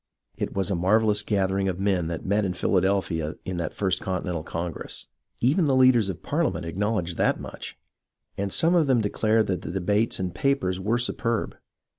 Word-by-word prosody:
It - - -4
was 100 +1 0
a - - +1
marvellous 105 +4 +3
gathering 95 -2 0
of 95 -1 -2
men 95 -4 +1
that 85 -1 -5
met 105 +2 +1
in 90 -2 -2
Phila 90 +1 +2
delphia 85 -5 0
in 95 -2 -3
that 85 -3 -2
First 95 -2 -1
Continental 90 -3 -2
Congress. 85 +1 -5 0.4
Even 150 +7 +3
the 135 - +3
leaders 130 -5 +5
of 90 -2 -6
Parliament 145 - -1
acknowledged 90 0 -2
that - - +2
much, - - -8 0.6
and 100 0 -3
some 165 - +3
of 165 -4 +3
them 130 -4 +3
declared 110 +1 +1
that 95 -2 -2
the - - -6
debates 100 +5 0
and 90 -2 -2
papers 135 -8 0
were 110 +5 +1
superb. 120 -1 -1
100 Hz, 185 wpm, -25 LUFS, 90-115 Hz, 0.6 s, leaders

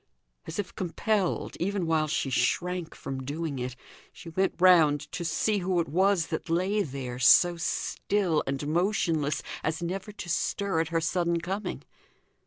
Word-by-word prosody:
As - - -5
if 200 -2 -3
compelled, 190 +2 -1
even 195 0 -1
while 160 -1 +1
she 140 -2 -1
shrank 175 +5 0
from 135 -1 -5
doing 145 0 -3
it, 125 0 -4 0.4
she 180 -2 -11
went 190 +4 0
round 165 -6 +6
to 175 - -4
see 205 +5 +1
who 180 -1 0
it 165 - 0
was 185 +2 +2
that 160 - -3
lay 185 +5 +1
there, 130 -6 -5
so 175 +7 +6
still 170 0 0
and 140 +2 -2
motionless 165 -3 +1 0.2
as 160 +2 -2
never 190 +4 -4
to 200 -3 -8
stir 190 +1 0
at 165 - +1
her 165 +1 0
sudden 170 +1 +1
coming. 190 +5 -4
170 Hz, 160 wpm, -28 LUFS, 155-190 Hz, 0.4 s, round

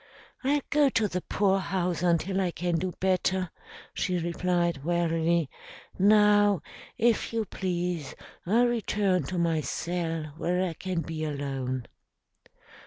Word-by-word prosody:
"I'll 285 +2 +2
go 295 -2 +5
to 225 -4 +1
the 185 -2 -3
poorhouse 190 -4 0
until 180 +2 +1
I 185 - +1
can 175 0 -1
do 185 +2 -2
better," 185 -1 +1 0.4
she 180 - -1
replied 170 -2 0
wearily. 170 -1 +1 0.5
"Now, 205 -2 +5 0.3
if 230 -1 +2
you 225 -1 -1
please, 175 -7 -3 0.3
I'll 230 +6 +4
return 210 -6 +1
to 185 - -4
my 165 -2 +1
cell 165 0 -3
where 180 +2 0
I 170 - -4
can 180 0 -3
be 160 -1 -5
alone." 135 -4 -3
180 Hz, 125 wpm, -28 LUFS, 165-195 Hz, 0.5 s, go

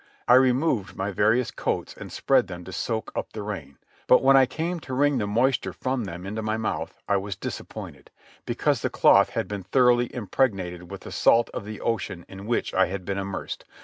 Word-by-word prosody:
I 125 - +6
removed 130 - +3
my 95 +2 -2
various 110 +5 +2
coats - - -2
and - - -9
spread - - +2
them 90 0 -8
to 95 - -9
soak 110 +5 -3
up - - -4
the 105 - -5
rain; 80 -10 -6 0.3
but, 125 - +6
when 135 +1 +6
I 135 -1 +6
came 170 +6 -3
to 130 -4 -6
wring 145 -1 +3
the 105 - -1
moisture 120 +5 +1
from 130 -3 -2
them 90 -1 -7
into 105 +3 -4
my 110 0 -1
mouth, 110 - -3
I 100 - +3
was 100 0 -4
disappointed, - - -7 0.3
because - - 0
the - - 0
cloth - - +5
had - - -2
been 105 -1 -4
thoroughly 120 +4 +3
impregnated 95 -7 -1
with 100 -1 -8
the - - -9
salt 120 +1 +3
of - - -5
the 105 -1 -7
ocean 100 -6 -2
in 95 +2 -10
which 120 - -1
I 95 0 +4
had 95 0 -5
been 100 +1 -2
immersed. 95 0 -5
105 Hz, 210 wpm, -25 LUFS, 95-125 Hz, 0.3 s, I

